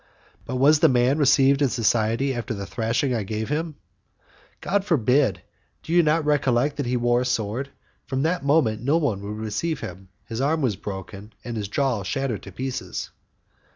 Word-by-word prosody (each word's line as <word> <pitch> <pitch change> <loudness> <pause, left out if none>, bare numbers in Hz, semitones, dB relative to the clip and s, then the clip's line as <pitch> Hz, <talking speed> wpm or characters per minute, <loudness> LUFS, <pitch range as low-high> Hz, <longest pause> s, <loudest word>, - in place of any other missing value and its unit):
"But 130 - -4
was 145 +4 +5
the - - +5
man 125 +3 +2
received 140 0 +4
in 140 - +3
society 115 +3 +1
after 120 -1 -4
the 100 -1 -5
thrashing 120 +5 -1
I 115 - 0
gave 110 +3 -4
him?" 155 +1 -2 0.8
"God 200 +1 0
forbid! 135 - +2 0.4
Do 165 - -4
you 175 - +6
not 155 0 +2
recollect 140 -1 +1
that 140 -4 -2
he 125 +1 +1
wore 120 0 +2
a - - -1
sword? 125 +2 -2 0.4
From 135 0 -1
that 165 0 0
moment 140 -7 +2
no 140 +6 +2
one 130 -12 -1
would 105 +1 -6
receive 135 +8 -3
him. 95 -2 -8 0.2
His 115 +1 -4
arm 155 +2 +1
was 115 -6 +1
broken 100 +1 -8
and 120 -1 -5
his 105 -2 -3
jaw 125 0 0
shattered 130 +2 -2
to 95 - -10
pieces. 130 +4 -5
125 Hz, 185 wpm, -24 LUFS, 110-145 Hz, 0.8 s, you